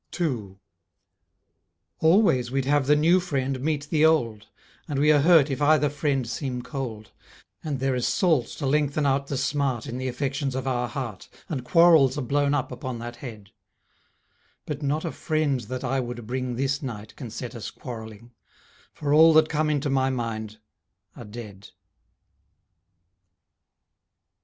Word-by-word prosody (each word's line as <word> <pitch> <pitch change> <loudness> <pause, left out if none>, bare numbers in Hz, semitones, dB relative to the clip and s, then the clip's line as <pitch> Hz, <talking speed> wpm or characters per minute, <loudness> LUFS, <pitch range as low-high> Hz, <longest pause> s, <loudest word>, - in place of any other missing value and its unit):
2 115 - -3 1.4
Always 160 - +4
we'd 135 +1 -1
have 145 -1 +2
the 150 - +5
new 165 +5 +4
friend 135 -6 -2
meet 150 0 -1
the 155 -1 +3
old, 120 -10 +2 0.4
And 145 - -3
we 150 +2 +4
are 150 - +5
hurt 155 -3 +5
if 135 - -3
either 150 -1 +4
friend 140 -4 -1
seem 125 0 -4
cold, 115 -7 -6 0.5
And 145 -4 -3
there 135 0 0
is 125 -1 0
salt 160 - +2
to - - -6
lengthen 145 +1 +1
out 140 0 +1
the 140 - -3
smart 135 -3 -1
In 125 - -5
the 130 - -3
affections 135 +1 -2
of 130 -1 -3
our 125 -2 0
heart, 120 -8 -6 0.2
And 140 -7 -3
quarrels 160 -3 +5
are 145 - -2
blown 145 +3 +1
up 130 -2 -2
upon 125 0 -5
that 120 +1 -7
head; 110 -7 -10 1.1
But 150 -1 -5
not 150 +3 -1
a 165 - -2
friend 155 -4 0
that 130 +1 -6
I 135 +1 0
would 120 -2 -5
bring 125 +1 -3
This 135 +2 -1
night 110 -6 -7
can 125 -5 -8
set 120 +2 -6
us 115 -4 -6
quarrelling, 110 -2 -9 0.6
For 145 -1 -1
all 160 +1 +7
that 155 0 +5
come 155 0 0
into 145 -1 0
my 135 -1 +2
mind 110 -4 -4 0.6
are 120 - -10
dead. 105 -3 -10
135 Hz, 160 wpm, -25 LUFS, 120-150 Hz, 1.4 s, all